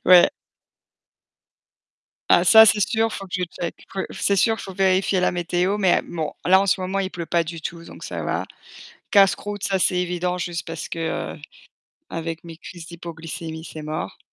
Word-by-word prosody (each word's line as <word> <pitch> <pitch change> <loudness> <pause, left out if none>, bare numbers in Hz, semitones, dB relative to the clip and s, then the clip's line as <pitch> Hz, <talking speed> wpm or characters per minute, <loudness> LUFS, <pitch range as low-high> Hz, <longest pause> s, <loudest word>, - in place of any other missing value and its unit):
Ouais. 180 -1 +8 2.0
Ah, - - +6
ça, 220 0 +9
c'est 210 0 +4
sûr, 225 +2 +1
faut 195 - -6
que - - -7
je 180 - 0
check. 170 0 -6
Faut 195 - -4
c'est 200 - 0
sûr, 225 +3 +3
faut 195 - -7
vérifier 190 0 +2
la - - +2
météo 180 +3 0
mais 190 -3 +3
bon, 160 -3 -4
là, 190 +2 +6
en 200 - 0
ce 190 - +2
moment, 185 +2 -2
il 195 - 0
pleut 170 -2 -5
pas 170 0 +1
du 165 0 -7
tout 170 +1 -6
donc - - -12
ça - - -5
va. - - -1 0.7
Casse-croûte, 205 0 +3
ça, 195 -1 +1
c'est 180 - +2
évident, 180 0 -1
juste 175 -1 -4
parce 165 -1 -6
que 165 -1 -3 0.7
avec 165 0 -4
mes 165 -1 -10
crises 170 0 -10
d'hypoglycémie, 165 -1 -7
c'est 155 -1 -8
mort. 155 +1 -5
180 Hz, 180 wpm, -23 LUFS, 165-195 Hz, 2.0 s, ça